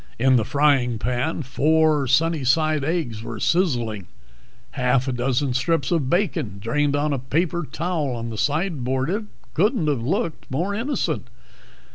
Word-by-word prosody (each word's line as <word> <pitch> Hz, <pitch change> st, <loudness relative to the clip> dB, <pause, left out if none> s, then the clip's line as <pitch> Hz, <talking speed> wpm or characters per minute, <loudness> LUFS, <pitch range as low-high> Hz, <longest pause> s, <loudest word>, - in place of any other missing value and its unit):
In 130 Hz, +2 st, +4 dB
the 115 Hz, -, +3 dB
frying 135 Hz, -3 st, +2 dB
pan 125 Hz, +8 st, -1 dB
four 150 Hz, +2 st, +2 dB
sunnyside 155 Hz, +1 st, +2 dB
eggs 145 Hz, -9 st, -2 dB
were 115 Hz, -, -6 dB
sizzling; 120 Hz, -, 0 dB, 0.6 s
half 125 Hz, -1 st, +1 dB
a -, -, +1 dB
dozen 125 Hz, +2 st, 0 dB
strips 140 Hz, +4 st, 0 dB
of 155 Hz, -7 st, +1 dB
bacon 160 Hz, -, 0 dB
drained 145 Hz, +7 st, 0 dB
on 145 Hz, 0 st, 0 dB
a 135 Hz, -, -1 dB
paper 165 Hz, +7 st, -1 dB
towel 160 Hz, -6 st, -2 dB
on 115 Hz, 0 st, -5 dB
the -, -, -6 dB
sideboard. 145 Hz, -3 st, 0 dB
It 210 Hz, +2 st, -2 dB, 0.3 s
couldn't 205 Hz, -, +2 dB
have 145 Hz, -5 st, 0 dB
looked 160 Hz, -, -2 dB
more 170 Hz, +10 st, -1 dB
innocent. 235 Hz, +8 st, -2 dB
145 Hz, 145 wpm, -23 LUFS, 125-165 Hz, 0.6 s, In